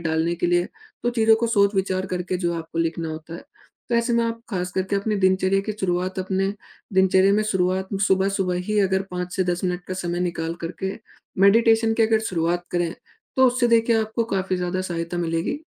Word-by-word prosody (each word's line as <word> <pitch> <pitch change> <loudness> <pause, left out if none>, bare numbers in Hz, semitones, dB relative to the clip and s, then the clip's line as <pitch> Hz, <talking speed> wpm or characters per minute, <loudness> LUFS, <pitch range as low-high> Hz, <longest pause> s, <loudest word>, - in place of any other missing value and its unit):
डालने 165 +1 0
के 175 - -1
लिए 175 0 +2 0.3
तो 240 - +1
चीज़ों 225 -2 +4
को 235 +1 0
सोच-विचार 195 -3 +1
करके 185 0 -2
जो 175 -1 -1
आपको 165 0 -6
लिखना 165 0 -1
होता 155 +1 -7
है। - - -8 0.5
तो 240 - 0
ऐसे 235 +1 +1
में 235 0 +2
आप 230 0 -3
ख़ास 180 -3 -3
करके 190 +1 -1
अपनी 210 +1 -1
दिनचर्या 190 +1 +2
की 215 - 0
शुरुआत 185 0 -1
अपने 190 +1 -1 0.4
दिनचर्या 190 +1 +4
में 215 - +3
शुरुआत 190 -2 0 0.2
सुबह-सुबह 190 -1 +1
ही 210 0 +1
अगर 190 -1 +1
5 180 0 -4
से 185 - +1
10 175 +1 -1
मिनट 180 -1 -2
का 185 - -3
समय 175 -1 -3
निकाल 170 -2 -2
कर 165 - -4
के 190 - -1 0.5
मेडिटेशन 225 +2 +5
की 225 - +2
अगर 220 0 +3
शुरुआत 175 0 0
करें। 175 -1 -1 0.4
तो 260 0 +6
उससे 245 0 +2
देखिए 230 0 +4
आपको 220 +1 -1
काफ़ी 190 -3 -1
ज़्यादा 180 +1 -2
सहायता 175 -1 -3
मिलेगी। 165 - -1
185 Hz, 200 wpm, -23 LUFS, 175-215 Hz, 0.5 s, तो